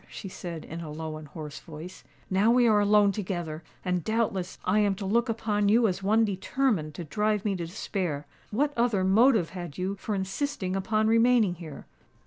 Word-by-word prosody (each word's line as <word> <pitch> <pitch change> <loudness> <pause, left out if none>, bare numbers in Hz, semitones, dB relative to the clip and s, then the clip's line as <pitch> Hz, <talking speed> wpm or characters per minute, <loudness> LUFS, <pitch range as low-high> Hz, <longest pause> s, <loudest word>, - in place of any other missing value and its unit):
she - - -8
said, 170 -3 -7
in 165 +2 -7
a 160 - -7
low 155 0 -5
and 155 -1 -10
hoarse 150 0 -8
voice. 165 +3 -10 0.2
"Now 195 +4 +3
we 240 0 +5
are 215 -2 +5
alone 205 0 +5
together—and 180 -2 -4
doubtless 210 -4 -1
I 195 +3 +3
am 205 -2 +2
to 195 +1 -6
look 230 +5 +1
upon 210 -2 0
you 230 +2 +5
as 190 0 -2
one 220 +3 +3
determined 200 - -1
to 175 - -5
drive 210 +5 0
me 200 -2 +1
to 170 -2 -4
despair. 170 -5 -3 0.2
What 285 +7 0
other 235 -5 +2
motive 215 -1 +4
had 175 -5 -7
you 190 +2 -2
for 210 +2 -3
insisting 195 0 -2
upon 215 +3 +1
remaining 230 -3 +4
here?" 160 -5 -9
195 Hz, 185 wpm, -27 LUFS, 175-220 Hz, 0.2 s, we